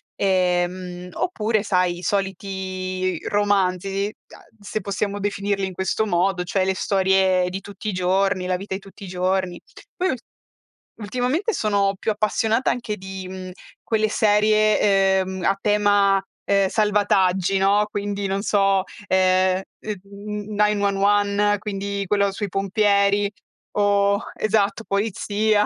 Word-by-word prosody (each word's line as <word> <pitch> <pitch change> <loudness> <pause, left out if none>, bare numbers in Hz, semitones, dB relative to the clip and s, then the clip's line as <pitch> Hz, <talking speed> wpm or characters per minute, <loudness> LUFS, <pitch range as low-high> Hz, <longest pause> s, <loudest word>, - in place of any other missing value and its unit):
ehm, 180 -1 0
oppure 220 - 0
sai, 180 -4 +1
i - - -10
soliti 185 -1 -2
romanzi, 195 -1 +1
uhm, 225 - -19
se 210 +1 -4
possiamo 200 0 -2
definirli 200 -1 -1
in 190 - -7
questo 190 +4 -1
modo, 180 0 +1
cioè 185 +1 0
le 190 - +1
storie 190 -1 +2
di 190 +1 -5
tutti 205 +2 -7
i - - 0
giorni, 185 +1 +1
la 185 - +1
vita 195 +1 -6
di 190 - -3
tutti 195 +1 -14
i - - -7
giorni. 185 0 -1 0.3
Poi 370 +1 0
ul 255 - -1 0.8
ultimamente, 250 - -1
sono 200 - +1
più - - -2
appassionata, 220 +3 +1
anche 225 -4 -3
di, 190 -1 -8
mhmm, 185 0 -7 0.3
quelle 220 -1 +1
serie, 215 0 +3 0.4
ehm, 190 0 -3
a 195 +1 +2
tema, 205 -2 +3 0.2
ehm, 200 -1 +2
salvataggi, 195 -3 +2
no, 200 +2 +3
quindi 205 -1 -3
non 195 +1 -1
so, 195 -2 +2 0.2
ehm, 185 0 +3 0.2
mhmm, 205 +1 -7
9-1-1, 205 0 +2
quindi 200 -1 -3
quello 200 0 +2
sui 205 +1 -4
pompieri 200 +1 +2 0.4
o 200 0 +2 0.2
esatto, 215 0 +1
polizia, 210 +1 +1
200 Hz, 130 wpm, -22 LUFS, 190-210 Hz, 0.8 s, serie